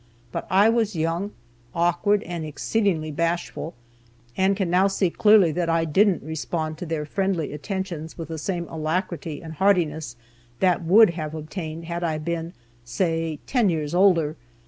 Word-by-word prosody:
But - - -4
I 195 +3 +5
was 225 -3 +1
young, 165 +5 -1 0.5
awkward, 175 +5 +2
and 170 -1 -5
exceedingly 155 +1 -1
bashful, 170 +1 -2 0.6
and 190 +1 +2
can 195 -3 0
now 180 +3 +4
see 195 -2 0
clearly 210 -5 +5
that 170 +1 -1
I 165 0 +2
didn't 190 +4 +3
respond 155 +1 -3
to 180 - -5
their 155 -2 -2
friendly 185 -2 -1
attentions 170 0 -5
with 165 -1 -6
the 160 -1 -4
same 170 +1 -3
alacrity 160 -1 -3
and 160 -1 -7
heartiness 160 -7 +1 0.4
that 180 -2 +2
would 200 +4 +6
have 155 -2 -5
obtained 160 +1 -6
had 170 +1 -4
I 160 -2 0
been, 165 +2 -4 0.3
say, 165 +4 -1
ten 240 -6 +2
years 155 -3 -2
older. 170 -5 +3
170 Hz, 155 wpm, -24 LUFS, 160-190 Hz, 0.6 s, would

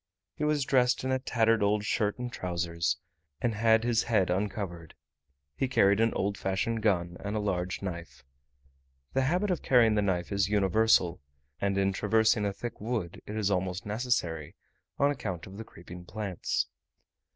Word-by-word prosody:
He - - -5
was 150 -2 +1
dressed 125 -2 +3
in 130 - -1
a 130 - +1
tattered 115 -3 +2
old 105 +1 +2
shirt 105 0 0
and 125 -1 -5
trousers, 85 0 -1 0.4
and 120 - 0
had 110 +1 +3
his 120 -2 +2
head 100 -6 +2
uncovered: 95 -4 -3 0.6
he 135 - 0
carried 100 -5 +4
an 115 0 +3
old 100 +1 -1
fashioned 100 +4 -1
gun 90 -5 +1
and 100 +1 -4
a - - +1
large 95 -2 -2
knife. 85 -8 -6 0.9
The 135 - +2
habit 180 +9 +1
of 180 - -1
carrying 120 -4 +4
the 105 - +2
knife 95 -3 -1
is 100 0 +1
universal; 105 -3 +3 0.4
and 100 -1 0
in 95 0 +2
traversing 110 +1 +2
a 100 - +1
thick 115 +3 -7
wood 110 -6 -3
it 105 - -5
is 105 -2 0
almost 90 -1 -1
necessary, 105 - -1 0.4
on 140 +1 +3
account 95 - -4
of 95 +1 -11
the 110 - -6
creeping 90 -3 -12
plants. 100 -2 -2
105 Hz, 170 wpm, -29 LUFS, 95-115 Hz, 0.9 s, carried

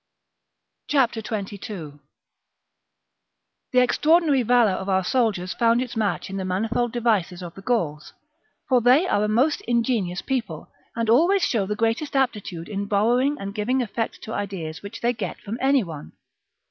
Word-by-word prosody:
^ 245 -6 +2
22. 200 -8 -6 1.7
The 255 - +4
extraordinary 300 +2 +3
valour 240 -2 +4
of 190 +1 -4
our 190 0 +2
soldiers 205 -6 0
found 230 0 +3
its 250 -1 -4
match 205 -7 -1
in 195 - -5
the 190 - -3
manifold 220 +6 -1
devices 205 -7 0
of 170 -1 -8
the 195 - -11
Gauls; 170 -10 -1 0.6
for 255 -2 +3
they 255 +9 +5
are 205 - +1
a - - +1
most 255 +8 +2
ingenious 230 -7 0
people, 260 -4 -3 0.2
and 230 -1 -1
always 340 - +4
show 205 -6 +1
the 210 - -2
greatest 230 +7 -1
aptitude 210 -10 -1
in 200 -1 -4
borrowing 245 +8 +2
and 200 0 -5
giving 245 +5 0
effect 225 0 -4
to 220 - -6
ideas 180 -6 -4
which 200 - -9
they 240 +1 +2
get 225 - -5
from 220 +4 -6
any 270 -1 +3
one. 160 -5 -9
225 Hz, 160 wpm, -24 LUFS, 195-245 Hz, 1.7 s, they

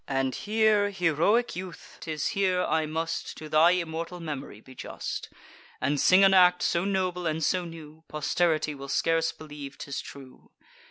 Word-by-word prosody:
And 135 -1 0
here, 215 -1 +2
heroic 195 +5 +1
youth, 180 -1 -9
'tis 155 -2 -3
here 185 -2 +1
I 160 -1 0
must 160 +1 -3
To 155 - -8
thy 155 +2 +5
immortal 170 0 -2
memory 145 -9 -6
be 130 +4 -15
just, - - -6 0.5
And 140 +2 0
sing 185 +2 +6
an 195 0 +6
act 180 -1 +5
so 170 +2 +1
noble 185 -3 -1
and 160 0 -1
so 180 +3 +1
new, 160 -1 -11
Posterity 155 0 0
will 140 -1 -9
scarce 165 +2 +1
believe 145 -3 -10
'tis 140 0 -5
true. 135 -2 -13
165 Hz, 160 wpm, -27 LUFS, 150-180 Hz, 0.5 s, sing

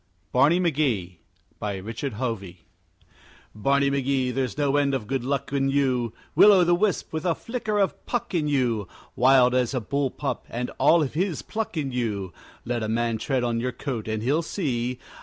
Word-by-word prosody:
BARNEY 145 +7 +4
MCGEE 130 - 0 0.4
BY 105 -2 -3
RICHARD 115 +7 -5
HOVEY 105 -6 -5 0.9
Barney 140 +6 +2
McGee, 135 -2 0
there's 130 +1 -2
no 145 -2 +1
end 140 -1 +2
of 125 -5 -3
good 130 +1 -2
luck 140 +1 -2
in 135 -1 +1
you, 130 -4 +1 0.2
Will 210 - +8
o' 190 -3 +6
the 175 0 +3
wisp, 195 0 0
with 160 0 -2
a 175 -3 +1
flicker 230 -3 -3
of 195 -7 0
Puck 240 -4 -2
in 160 -4 +1
you, 120 -8 0 0.3
Wild 125 0 +5
as 125 +1 +1
a - - +1
bull 140 +5 -1
pup, - - -4
and 125 +1 -3
all 155 +4 +5
of 135 - -4
his 175 0 -1
pluck 220 -6 -4
in 140 -3 -1
you 105 -7 -2 0.3
Let 120 0 -2
a 110 - -2
man 115 0 0
tread 130 +2 0
on 120 -1 0
your 125 +1 -2
coat 120 -4 -4
and 110 0 -2
he'll 145 +7 +2
see! 125 -8 -2
130 Hz, 190 wpm, -25 LUFS, 120-150 Hz, 0.9 s, Will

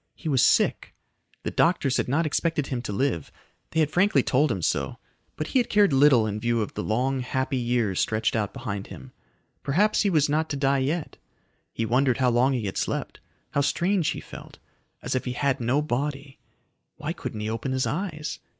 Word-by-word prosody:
He 165 - -8
was 135 -5 +3
sick. - - +2 0.5
The - - -3
doctors 145 -6 +2
had - - 0
not 150 +6 +1
expected 155 -1 0
him 130 -3 -3
to 120 - -5
live; 100 - -1 0.4
they 160 - +1
had 150 -1 +1
frankly 180 -6 +3
told 140 +2 +2
him 95 -6 -3
so - - -1 0.4
but 155 - -4
he 260 - +3
had 240 - 0
cared 205 -7 +4
little 135 -4 +5
in 105 0 -3
view 120 +1 0
of - - -7
the 105 - -3
long, 130 +5 0
happy 130 +2 -1
years 120 -6 0
stretched 110 +1 0
out 105 -3 -1
behind 110 -7 -5
him. 65 -1 -11 0.5
Perhaps 195 +10 +2
he 205 - +2
was 155 -5 +3
not 155 +2 0
to 145 - -2
die 135 0 +2
yet. 150 +5 -2 0.5
He 115 - -2
wondered 125 +3 +2
how 130 -2 +2
long 125 +3 +3
he 120 -4 -2
had 95 - -4
slept. - - -3 0.3
How 145 - +1
strange 175 +3 +1
he - - -2
felt - - -11 0.5
as - - -2
if 130 - -1
he 125 - -2
had 140 +2 0
no 130 +6 +1
body. 140 0 -3 0.6
Why - - -4
couldn't 105 - -6
he 105 - -2
open 115 +4 -3
his 130 0 0
eyes? 155 -3 -3
135 Hz, 205 wpm, -25 LUFS, 120-150 Hz, 0.6 s, little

